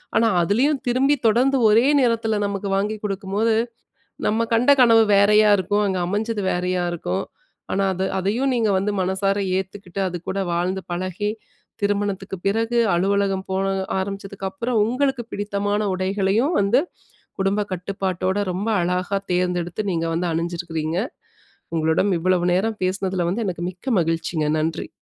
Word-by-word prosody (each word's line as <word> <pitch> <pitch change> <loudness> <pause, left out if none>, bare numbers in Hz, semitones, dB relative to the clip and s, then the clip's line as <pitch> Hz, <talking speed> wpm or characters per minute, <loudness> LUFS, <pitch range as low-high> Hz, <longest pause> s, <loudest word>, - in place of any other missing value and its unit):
ஆனா 230 - +4 0.2
அதிலயும் 260 - +1
திரும்பி 270 +4 +3
தொடர்ந்து 255 +5 +3
ஒரே 230 +5 +5
நேரத்தில 225 -3 +1
நமக்கு 200 0 -3
வாங்கி 210 +2 -1
குடுக்கும்போது, 205 +3 0 0.7
நம்ம 225 +2 +1
கண்ட 240 +4 +4
கனவு 225 -2 +6
வேறயா 210 +1 +5
இருக்கும், 205 +3 +1
அங்க 190 -1 -1
அமைஞ்சது 210 +2 -2
வேறயா 180 0 -1
இருக்கும். 95 - -2 0.5
ஆனா, 195 - +1
அது 190 +1 -2
அதையும் 225 +8 0
நீங்க 230 -3 +1
வந்து 195 +2 0
மனசார 190 +2 0 0.2
ஏத்துக்கிட்டு 190 0 -5
அதுக்கூட 180 +2 -4
வாழ்ந்து 180 +3 -1
பழகி, 185 +3 -2 0.5
திருமணத்துக்குப் 200 -2 -2
பிறகு 225 +4 +1 0.2
அலுவலகம் 195 +1 +1
போக 195 +1 0 0.3
ஆரம்பிச்சதுக்கு 195 0 -4
அப்புறம், 230 +4 -1
உங்களுக்கு 255 +1 0
பிடித்தமான 205 0 -1
உடைகளையும் 195 - +1
வந்து, 205 +6 +3 0.6
குடும்ப 200 +2 +1
கட்டுப்பாட்டோட 190 +1 -2
ரொம்ப 195 +5 -3
அழகா 180 +3 0
தேர்ந்தெடுத்து, 180 +2 -1
நீங்க 165 -1 -1
வந்து 175 +1 -1
அணிஞ்சிருக்கிறீங்க. 165 -1 -3 0.8
உங்களிடம் 160 +5 +2
இவ்வளவு 180 0 +2
நேரம் 215 +4 -1
பேசினதில 185 -2 -1
வந்து 225 +5 -2
எனக்கு 175 -2 -4
மிக்க 215 +9 -4
மகிழ்ச்சிங்க! 165 -1 -1
நன்றி. 160 +1 -2
195 Hz, 130 wpm, -22 LUFS, 180-215 Hz, 0.8 s, கனவு